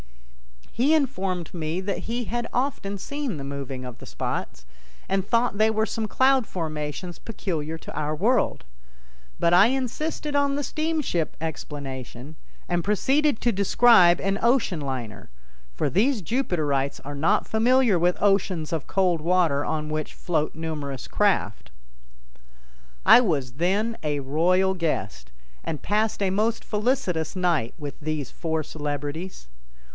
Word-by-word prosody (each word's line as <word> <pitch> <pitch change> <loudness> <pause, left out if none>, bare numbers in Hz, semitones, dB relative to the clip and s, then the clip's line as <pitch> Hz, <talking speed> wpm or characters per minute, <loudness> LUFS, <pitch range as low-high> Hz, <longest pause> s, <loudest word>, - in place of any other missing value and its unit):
He 275 +7 +3
informed 195 - -1
me 165 0 -2
that 195 +1 -2
he 240 +1 -1
had 235 +3 -3
often 245 -6 -1
seen 280 - -4
the 140 - -6
moving 135 -2 -5
of 125 -2 -9
the - - -11
spots, - - -4 0.4
and 195 0 +1
thought 230 0 +1
they 220 +1 +5
were 220 0 +1
some 220 -1 -3
cloud 260 -1 +3
formations 160 +1 -4
peculiar 165 -8 -4
to - - -10
our 150 +1 -1
world. 230 +8 +1 0.8
But 170 0 +3
I 185 +4 +7
insisted 270 +4 -2
on 280 -1 +2
the 290 - -1
steamship 310 - -1
explanation 140 -3 -6 0.3
and 175 -1 0
proceeded 265 - +2
to 240 - +2
describe 200 -3 +5
an 195 +1 0
ocean 235 -8 +2
liner, 120 -8 -5 0.5
for - - 0
these 215 - +2
Jupiterites 155 - 0
are 145 - -5
not 170 +9 +1
familiar 235 -3 +3
with 175 +1 +2
oceans 190 -5 +1
of 160 -4 -3
cold 180 -4 +1
water 165 -4 +2
on 155 0 -2
which 155 0 -4
float 155 -4 -1
numerous 150 -5 -5
craft. - - 0 1.4
I - - +9
was 145 - -1
then 200 - 0
a 150 -1 -1
royal 180 +7 +2
guest, 105 - -3 0.3
and 155 -3 -4
passed 210 0 0
a 190 - +1
most 220 +4 0
felicitous 210 - -1
night 170 -10 0
with 145 -3 -7
these 155 -3 -3
four 160 -2 -2
celebrities. 145 - -5
180 Hz, 140 wpm, -25 LUFS, 150-225 Hz, 1.4 s, I